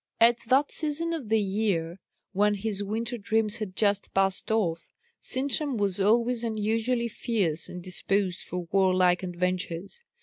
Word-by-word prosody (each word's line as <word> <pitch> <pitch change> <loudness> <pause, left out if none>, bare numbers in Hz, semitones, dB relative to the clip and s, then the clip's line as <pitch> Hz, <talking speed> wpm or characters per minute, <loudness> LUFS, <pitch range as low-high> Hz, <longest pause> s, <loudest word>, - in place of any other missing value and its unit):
At 235 +1 +6
that 270 +4 +3
season 325 +2 -1
of 285 -10 -5
the 220 0 +3
year, 195 -4 -1 0.3
when 205 +2 +3
his 205 0 -2
winter 230 +4 -3
dreams 220 +1 0
had 210 -5 -5
just 205 -2 +1
passed 195 0 +1
off, 190 -7 +1 0.4
Sintram 275 0 -1
was 200 -2 0
always 235 +3 +2
unusually 225 +2 0
fierce 205 -9 -1
and 180 -1 -8
disposed 185 0 0
for 180 -1 -5
warlike 185 -2 +3
adventures. 180 - -3
205 Hz, 140 wpm, -27 LUFS, 185-230 Hz, 0.4 s, At